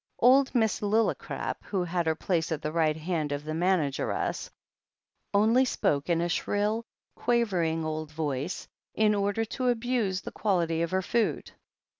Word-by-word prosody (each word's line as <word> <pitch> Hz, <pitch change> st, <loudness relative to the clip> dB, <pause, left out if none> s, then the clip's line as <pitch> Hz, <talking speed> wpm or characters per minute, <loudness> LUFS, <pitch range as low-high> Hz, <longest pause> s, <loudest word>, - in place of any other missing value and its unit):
Old 260 Hz, +3 st, +5 dB
Miss 220 Hz, -3 st, +2 dB
Lillicrap, 215 Hz, +2 st, 0 dB
who 190 Hz, -3 st, -1 dB
had 175 Hz, -1 st, -1 dB
her 160 Hz, -, +2 dB
place 165 Hz, -1 st, -1 dB
at 160 Hz, -1 st, -2 dB
the 150 Hz, -, -2 dB
right 155 Hz, -1 st, +1 dB
hand 160 Hz, -2 st, -2 dB
of 145 Hz, 0 st, -3 dB
the 155 Hz, +1 st, -4 dB
manageress, 165 Hz, -4 st, 0 dB, 0.8 s
only 220 Hz, +5 st, +4 dB
spoke 145 Hz, -, 0 dB
in 170 Hz, -1 st, +2 dB
a 170 Hz, -, +1 dB
shrill, 210 Hz, +6 st, -1 dB, 0.3 s
quaver 235 Hz, -7 st, +1 dB
ing 160 Hz, 0 st, 0 dB
old 155 Hz, 0 st, -3 dB
voice, 150 Hz, +1 st, -3 dB, 0.3 s
in 215 Hz, -1 st, +4 dB
order 205 Hz, +2 st, 0 dB
to 255 Hz, +3 st, -3 dB
abuse 230 Hz, -5 st, 0 dB
the -, -, -7 dB
quality 170 Hz, -5 st, 0 dB
of 170 Hz, -, 0 dB
her 190 Hz, 0 st, 0 dB
food. 235 Hz, +3 st, 0 dB
185 Hz, 160 wpm, -28 LUFS, 160-220 Hz, 0.8 s, Old